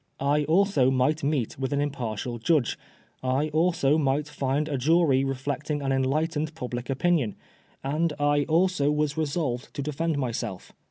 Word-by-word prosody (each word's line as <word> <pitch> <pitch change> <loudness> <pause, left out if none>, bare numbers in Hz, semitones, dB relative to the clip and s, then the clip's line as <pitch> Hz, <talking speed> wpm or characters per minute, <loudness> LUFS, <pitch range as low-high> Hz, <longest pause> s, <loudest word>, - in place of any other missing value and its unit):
I 145 +2 +2
also 165 -5 +3
might 135 +4 +1
meet 140 -5 -1
with 135 0 -2
an 140 - +1
impartial 120 -4 -3
judge, 140 0 +2 0.5
I 130 +4 0
also 160 -2 +2
might 140 +1 +1
find 145 +1 -1
a 150 - -2
jury 140 0 +3
reflecting 140 +2 -2
an 135 - 0
enlightened 150 +4 0
public 125 -4 -5
opinion, 135 - +1 0.5
and 155 +4 0
I 145 0 +2
also 170 -2 +2
was 150 -1 0
resolved 145 -5 -2
to 140 - -3
defend 150 +2 -1
myself. 115 -8 -4
145 Hz, 150 wpm, -26 LUFS, 135-155 Hz, 0.5 s, also